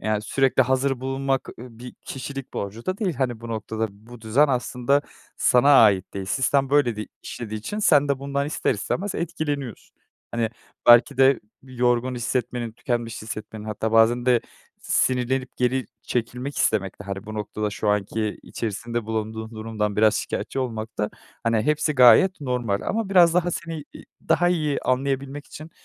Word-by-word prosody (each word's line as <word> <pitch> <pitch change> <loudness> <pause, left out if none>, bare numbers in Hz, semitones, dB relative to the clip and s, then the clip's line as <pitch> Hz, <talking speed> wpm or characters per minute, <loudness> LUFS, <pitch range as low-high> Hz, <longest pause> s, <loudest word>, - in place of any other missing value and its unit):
yani, 110 -1 -1
sürekli 130 +4 +2
hazır 130 0 0
bulunmak, 135 0 -1
eee, 120 - -8
bir 120 +2 -11
kişilik 135 0 -7
borcu 100 +4 -5
da 185 +1 -1
değil. 190 -8 -1
Hani, 120 -3 -2
bu 115 - -8
noktada, 110 0 -3
bu 110 +4 -15
düzen 120 +7 +3
aslında 125 +1 +1 0.4
sana 125 +3 +4
ait 100 -4 +3
değil. 95 -1 -4
Sistem 135 +6 +1
böyle 140 -6 +3
di 105 - -5 0.2
işlediği 110 -2 -6
için 205 - -5
sen 145 -8 +4
de 140 -1 +1
bundan 140 +1 -2
ister 150 -3 0
istemez 185 - -3
etkileniyorsun. 145 - -4 0.4
Hani, 115 -1 0 0.4
belki 120 0 +7
de 135 0 +5 0.2
yorgun 125 -1 0
hissetmenin, 120 -1 -2
tükenmiş 115 -1 -3
hissetmenin 110 0 -7
hatta 110 +1 -3
bazen 115 +2 +4
de 125 -2 +4 0.4
sinirlenip 130 0 0
geri 125 -1 0 0.2
çekilmek 125 +3 -3
istemekte, 100 -1 0
hani, 100 +1 -6
bu 110 - -6
noktada 105 0 -3
şu 105 +1 -3
anki 105 +1 -1
içerisinde 115 +1 -4
bulunduğun 110 0 -3
durumdan 110 -2 -3
biraz 110 +1 +4
şikayetçi - - -3
olmakta, 110 -4 -3 0.3
hani, 115 -2 +2
hepsi 150 +2 +1
gayet 130 +9 +6
normal 125 -7 -1
ama 225 -1 -2
biraz 175 -3 +6
daha 175 0 +2
seni 165 -3 -5
i - - -11 0.2
daha 170 +2 +4
iyi 155 -5 0
anlayabilmek 135 +2 -1
için, 155 +2 -10
125 Hz, 160 wpm, -24 LUFS, 110-140 Hz, 0.4 s, belki